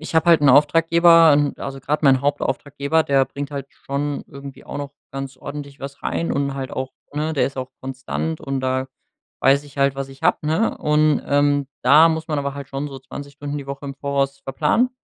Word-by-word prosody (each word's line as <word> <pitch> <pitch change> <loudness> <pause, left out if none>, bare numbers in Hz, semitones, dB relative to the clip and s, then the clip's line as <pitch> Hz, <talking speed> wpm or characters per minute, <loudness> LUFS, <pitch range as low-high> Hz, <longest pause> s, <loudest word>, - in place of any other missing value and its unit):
Ich 160 - -8
hab 160 - +3
halt 165 -3 +6
'n 140 - +5
Auftraggeber, 165 +3 +6
ähm 145 -1 +1
also 135 0 -6
grad 150 +4 -1
mein 135 -2 +5
Hauptauftraggeber, 145 +2 0
der 135 -1 +3
bringt 140 +1 -6
halt 140 -1 -5
schon 140 +1 -4
irgendwie 140 -1 -11
auch - - -6
noch 140 -1 -5 0.2
ganz 135 -1 -6
ordentlich 140 +1 -8
was 140 0 -8
rein 170 - -1
und 140 -1 -1
halt 135 -1 -5
auch 130 0 -3 0.2
ne, 155 +2 -1
der 145 - +2
ist 135 - -7
auch 130 0 -5
konstant 135 +5 -4
und 135 -1 -3
da 130 0 -1 0.5
weiß 140 +2 +4
ich 140 -1 -14
halt, 140 0 +3
was 135 0 -4
ich 135 0 -15
hab, - - +2
ne? 160 +9 0
Und, 150 0 +2
ähm, 145 -1 +2
da 150 +6 +7
muss 160 0 -2
man 150 - 0
aber 140 0 -3
halt 140 -1 -8
schon 140 +2 -4
so 135 -1 -8
20 140 +2 -9
Stunden 145 +1 -5
die 140 - -8
Woche 140 +1 -6
im 140 - -5
Voraus 140 0 -1
verplanen. 155 - +1
140 Hz, 215 wpm, -21 LUFS, 135-150 Hz, 0.5 s, da